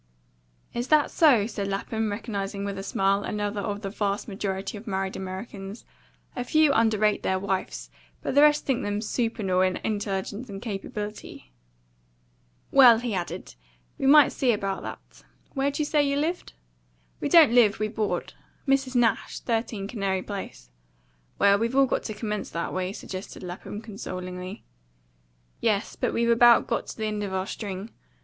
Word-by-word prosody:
"Is 240 +1 -2
that 305 0 +4
so?" 265 -11 +5
said 205 -3 -4
Lapham, 215 +3 -2
recognising 200 -2 -4
with 200 -1 -3
a - - -3
smile 195 0 +1
another 205 -1 -2
of 205 +1 -4
the 195 - -3
vast 205 -1 -2
majority 195 -1 -3
of 210 +3 -10
married 190 -1 -2
Americans; 195 +2 -7 0.5
a 245 - -2
few 310 +2 +4
underrate 215 -3 +2
their 190 - 0
wives, 190 0 -3 0.3
but - - -2
the 285 - +6
rest 295 0 +5
think 265 -3 0
them 205 0 -2
supernal 215 -4 0
in 185 0 +2
intelligence 205 +2 -3
and 195 -1 -6
capability. 210 - -6 1.2
"Well," 250 -4 +8
he 235 -1 -3
added, 175 - -4 0.5
"we 270 - +1
must 295 0 +6
see 255 -3 +4
about 195 -3 -2
that. - - -10 0.3
Where'd 280 0 0
you 300 - 0
say 295 0 +2
you 280 0 +1
lived?" 330 +5 -2 0.7
"We - - -2
don't 320 -8 +7
live; 225 -4 +5
we 215 - 0
board. 215 -1 -2 0.3
Mrs. 270 -1 +1
Nash, 230 -4 +1
13 225 -4 -2
Canary 195 -4 -2
Place." 190 - -7 0.7
"Well, 200 0 +5
we've 230 +3 -1
all 275 0 +6
got - - -1
to 215 - -4
commence 210 -1 -3
that 170 - -3
way," 185 0 -2
suggested 190 -1 -8
Lapham 180 +3 -7
consolingly. 185 -4 -7 1.0
"Yes; 210 -2 0
but - - -1
we've 235 0 +2
about 235 0 +6
got - - -2
to - - -8
the 220 - -2
end 210 -1 -2
of 200 -2 -4
our 190 0 -1
string. 200 0 -6
210 Hz, 165 wpm, -26 LUFS, 195-240 Hz, 1.2 s, Well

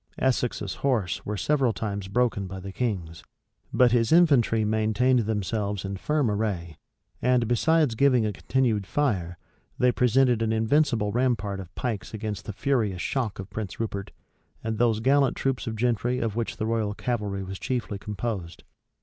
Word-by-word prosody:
Essex's 120 -6 0
horse 110 - 0
were 105 0 -2
several 135 +1 +2
times 100 -3 -4
broken 110 -2 0
by 95 +1 -7
the 95 +1 -7
king's, 95 -9 -3 0.5
but 125 -2 +4
his 115 -1 +2
infantry 140 -10 +4
maintained 110 +4 +2
themselves 105 -2 -2
in 95 0 -3
firm 145 +3 0
array; 100 -6 -2 0.5
and, 125 -2 +2
besides 150 +3 +3
giving 125 -1 +3
a 105 - -1
continued 110 -3 0
fire, 95 -13 0 0.4
they 125 0 +4
presented 125 -1 +3
an 110 -1 +1
invincible 110 -1 +2
rampart 110 -5 0
of 90 -3 -10
pikes 115 -3 -3
against 105 -2 -4
the - - -4
furious 105 -4 0
shock 120 -1 -2
of 95 0 -8
Prince 105 -4 -5
Rupert, 100 -3 -3 0.5
and 110 0 -3
those 115 -2 +2
gallant 135 +2 +3
troops 135 -1 -1
of 110 - -2
gentry 120 +1 0
of 115 -4 -2
which 115 -1 -2
the 110 - -2
royal 110 -2 -1
cavalry 105 -6 -2
was 95 0 -7
chiefly 120 -6 -3
composed. 105 -4 -5
110 Hz, 160 wpm, -26 LUFS, 100-125 Hz, 0.5 s, but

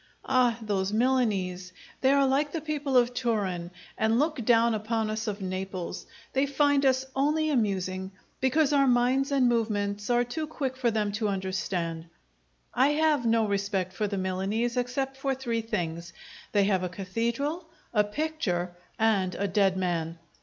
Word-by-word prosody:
Ah, 250 -3 +3
those 200 -2 -1
Milanese! 205 -7 0 0.3
They 265 - +4
are 280 0 +4
like 280 +2 +1
the 330 - -2
people 295 -3 -1
of 245 0 +3
Turin, 205 -8 -1 0.3
and 220 +1 +2
look 300 -2 0
down 230 +1 +4
upon 220 0 -1
us 220 +1 -3
of 205 -1 -3
Naples; 185 -1 -4 0.3
they 270 +1 +2
find 285 0 +3
us 260 0 +2
only 305 +3 +1
amusing, 190 -6 -1 0.3
because 290 +3 +2
our 275 -1 +4
minds 255 +3 +2
and 270 -3 +3
movements 210 -3 0
are 240 0 +3
too 305 +6 -4
quick 275 -4 -3
for 255 -2 +1
them 210 -2 0
to 215 +1 -1
understand. 185 -4 -2 0.7
I 255 +2 +4
have 300 -5 +2
no 225 -1 +3
respect 200 -2 -1
for 210 +2 -1
the 200 0 -3
Milanese, 195 +6 -1
except 265 +2 -2
for 270 0 -1
three 235 -3 -2
things: 170 -6 -4 0.4
they 205 -1 +3
have 195 -2 +2
a 180 - -2
cathedral, 235 - -3 0.2
a 210 -2 +4
picture, 205 - -2 0.2
and 200 -5 +2
a 200 - -1
dead 195 -1 +2
man. 170 -3 -1
225 Hz, 160 wpm, -28 LUFS, 190-265 Hz, 0.7 s, They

